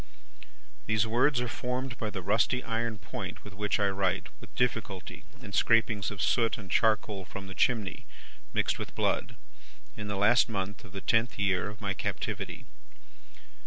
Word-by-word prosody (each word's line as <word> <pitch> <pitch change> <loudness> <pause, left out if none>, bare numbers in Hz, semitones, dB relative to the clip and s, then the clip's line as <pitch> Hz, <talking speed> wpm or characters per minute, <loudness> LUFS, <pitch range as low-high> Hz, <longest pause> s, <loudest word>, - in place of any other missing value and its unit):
"These 110 0 +3
words 125 +4 +3
are 125 - -1
formed 125 +2 -3
by 110 - -1
the 95 -3 -5
rusty 115 +6 +2
iron 115 -1 -1
point 100 -2 -6
with 105 - -10
which 105 +2 0
I 100 - +3
write 95 -1 0
with - - -13
difficulty 110 -8 -2 0.2
in 100 -3 -8
scrapings 110 -2 +3
of 105 -3 -3
soot 115 -2 +3
and 95 -4 -9
charcoal 105 -3 +2
from 95 +2 -7
the 95 - -7
chimney, 110 -2 0 0.4
mixed - - +1
with - - -6
blood, - - 0 0.6
in 105 - -5
the 100 -1 -2
last 115 +5 +5
month 100 -1 -3
of 90 - -13
the 95 - -5
tenth 115 +4 +2
year 100 -1 +2
of 105 +1 -11
my 100 -1 0
captivity. - - -3
105 Hz, 165 wpm, -30 LUFS, 100-115 Hz, 0.6 s, last